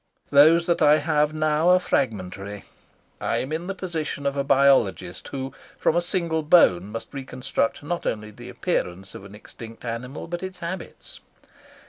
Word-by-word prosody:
Those 160 +4 +6
that 170 - 0
I 150 +1 +6
have 150 0 +1
now 155 +2 +1
are 180 0 +6
fragmentary. 100 - -2 0.6
I - - -1
am 130 - -3
in 165 +3 -3
the 195 - -3
position 160 -6 -4
of 140 0 0
a 140 - 0
biologist 135 -10 +2
who 135 -1 -5 0.2
from - - +1
a 175 - +3
single 170 -2 -1
bone 150 - +5
must 115 +6 -8
reconstruct 135 +1 -2
not 170 +3 -3
only 105 -1 -3
the - - -11
appearance 95 +2 -3
of 95 - -10
an 100 +1 -12
extinct 115 +2 -12
animal, 120 +4 -5
but 175 +1 -5
its 185 -1 -6
habits. 175 0 -7
140 Hz, 165 wpm, -24 LUFS, 115-165 Hz, 0.6 s, Those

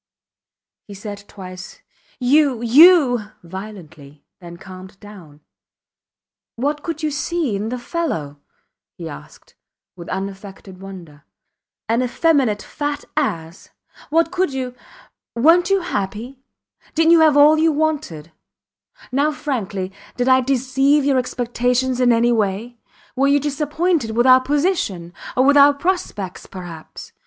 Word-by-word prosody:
He 200 - -10
said 205 0 -8
twice, 185 0 -11 0.4
You! 265 -1 +2
You! 265 - +6 0.2
violently, 165 -6 -11
then 170 -2 -11
calmed 185 +1 -12
down. 180 -8 -14 1.1
What 290 +5 -2
could 325 -1 -5
you 305 - 0
see 300 - -2
in 210 +3 -3
the 250 - -3
fellow? 240 - -4 0.6
he - - -8
asked, 70 - -12 0.4
with 170 -2 -10
unaffected 195 0 -7
wonder. 175 -7 -11 0.6
An 230 +2 +1
effeminate, 255 -4 +1
fat 290 -1 -4
ass. 170 - -3 0.4
What 330 +2 +2
could 365 -4 0
you... 260 -2 -4 0.6
Werent 330 +9 +4
you 390 -1 +2
happy? 235 - -4 0.6
Didnt 325 +1 +4
you 335 - +7
have 310 -2 +5
all 300 +2 +6
you 325 0 +3
wanted? 290 - -2 0.8
Now 285 +4 +1
frankly; 205 -11 -4 0.3
did 245 0 0
I 260 0 +5
deceive 270 +2 +1
your 275 -2 +3
expectations 250 +1 -1
in 245 -1 +4
any 235 +1 +3
way? 225 +2 -2 0.4
Were 270 +1 +2
you 285 +1 +4
disappointed 295 -3 -1
with 240 - +3
our 255 0 +7
position 270 - -1 0.2
or 255 - +4
with 285 +1 +5
our 285 0 +7
prospects 280 - -3
perhaps? 175 -4 -10
250 Hz, 130 wpm, -20 LUFS, 195-295 Hz, 1.1 s, you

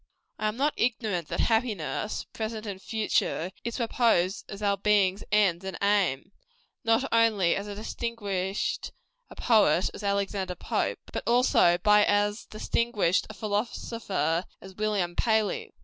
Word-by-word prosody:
I 215 - 0
am 215 +2 -3
not 290 +3 +1
ignorant 215 -8 -1
that - - -2
happiness 215 - -1
present 220 0 -4
and 195 -2 -6
future 210 -5 -1
is 235 - -3
proposed 225 -6 +1
as 200 +1 -7
our 200 -1 +2
"being's 200 -2 +2
end 195 -4 +3
and 190 0 -5
aim," 200 -8 +1 0.5
not 225 +2 +3
only 215 -6 +3
by - - -1
as 200 - -7
distinguished 205 -2 -3 0.4
a - - -12
poet 205 -7 +3
as - - -8
Alexander 200 -2 -1
Pope, - - -2
but - - -2
also 235 -7 +4
by 210 +3 +5
as 205 +1 +1
distinguished 215 -4 0
a 215 - -9
philosopher 205 -5 -2
as 190 0 -12
William 200 -4 -1
Paley. 220 -2 0
205 Hz, 140 wpm, -27 LUFS, 190-225 Hz, 0.5 s, by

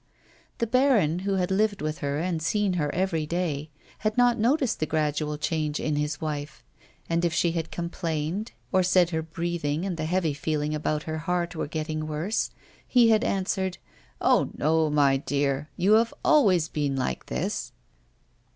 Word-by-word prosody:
The 235 - 0
baron, 230 - +3
who 195 +1 -1
had 185 0 0
lived 205 +1 +2
with 155 0 -3
her 140 0 -1
and 165 0 -1
seen 200 +4 +1
her 150 -5 0
every 165 -4 -1
day, 155 -3 -2 0.3
had 215 +1 -1
not 245 -2 +4
noticed 255 +1 +2
the 155 - 0
gradual 150 -1 -1
change 155 -1 -1
in 155 - -1
his 150 0 -1
wife, 150 -1 -5 0.4
and 170 +1 0
if 170 -1 +1
she 170 - +2
had 165 -1 -3
complained 170 +3 -3 0.2
or 185 - +4
said 180 -1 +3
her 160 -1 0
breathing 165 0 -2
and 185 -4 -3
the 160 - -2
heavy 165 -2 +1
feeling 150 +1 -2
about 150 0 -1
her 160 0 -4
heart 175 +2 -1
were 160 - -2
getting 155 0 -3
worse, 160 +8 -1 0.4
he 240 -3 +5
had 220 +1 +4
answered: 190 -2 -1 0.4
"Oh - - +3
no, 160 +1 +2
my 140 -2 +4
dear. 140 +1 -1
You 185 +3 +2
have 225 +2 +4
always 190 - +4
been 145 -3 -1
like 130 -1 -2
this." 195 +6 -3
165 Hz, 170 wpm, -26 LUFS, 150-190 Hz, 0.4 s, he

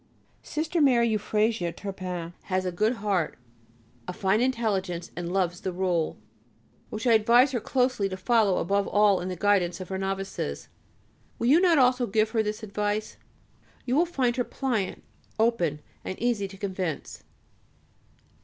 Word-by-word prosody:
Sister 320 +2 -2
Mary 240 -5 +4
Euphrasia 215 -3 0
Turpin 180 -3 -6
has 185 -1 -1
a 180 - -1
good 215 +7 +1
heart, 200 -7 -1 0.7
a - - -4
fine 195 +3 +1
intelligence, 205 -9 -1
and 175 0 -4
loves 180 -2 0
the 190 - -2
Rule, 175 -3 -1 0.7
which 215 +2 -5
I 235 - +5
advise 235 +5 +5
her 245 - -1
closely 250 -3 0
to 185 - -5
follow, 205 -1 +2
above 200 0 +1
all 205 -2 +3
in 180 - -4
the 185 - -3
guidance 185 -2 +1
of 185 - -7
her 190 0 -3
Novices. 195 - -4 0.7
Will 235 - 0
you 315 +6 +6
not 350 -4 +5
also 250 -2 +3
give 215 +2 +1
her 225 -1 +2
this 215 0 -4
advice? 210 +1 -2 0.7
You 250 - 0
will 340 +4 +3
find 260 -7 0
her 245 - +2
pliant, 235 -7 -2 0.3
open, 175 -10 +1 0.2
and 185 - -5
easy 230 -5 0
to 195 0 -12
convince. 185 -5 -4
205 Hz, 155 wpm, -27 LUFS, 185-235 Hz, 0.7 s, you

